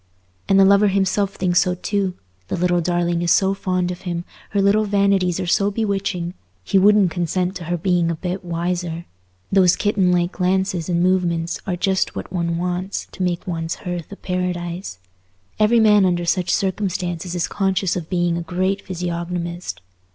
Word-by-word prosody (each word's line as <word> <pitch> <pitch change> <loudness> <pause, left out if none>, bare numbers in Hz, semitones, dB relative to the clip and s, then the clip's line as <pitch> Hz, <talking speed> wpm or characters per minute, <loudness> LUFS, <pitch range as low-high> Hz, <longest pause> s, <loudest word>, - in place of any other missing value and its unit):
And 195 - +5
the 195 - +7
lover 200 +1 +5
himself 195 0 +1
thinks 180 -1 +2
so 180 -1 0
too: 190 0 -1 0.3
the - - -2
little 175 0 +2
darling 175 0 0
is 175 - 0
so 190 +3 +4
fond 185 -2 -1
of 180 - -7
him, 175 -2 -4 0.2
her 205 - 0
little 200 +2 +3
vanities 195 -3 +2
are 185 - -2
so 200 +3 +2
bewitching, 200 -4 -2 0.3
he 195 - +2
wouldn't 200 -2 +5
consent 180 +2 -1
to 175 - -8
her 175 +2 -1
being 175 -1 +1
a 170 - -1
bit 180 +3 -4
wiser; 170 -1 -3 0.5
those 185 -2 +5
kittenlike 180 -4 +1
glances 185 -2 0
and 170 0 +1
movements 175 -2 0
are 185 - 0
just 190 +2 0
what - - -6
one 170 -2 -1
wants 180 +2 -3
to - - -9
make 175 -1 -1
one's 165 -2 -3
hearth 175 -2 -4
a - - -6
paradise. 180 - -3 0.6
Every 220 +2 +4
man 210 -2 +5
under 175 -2 +1
such 180 +1 0
circumstances 180 -3 -1
is 175 - 0
conscious 190 -2 0
of 170 -3 -5
being 175 -2 +1
a - - -4
great 185 +4 -1
physiognomist. 175 - -4
180 Hz, 175 wpm, -21 LUFS, 175-195 Hz, 0.6 s, the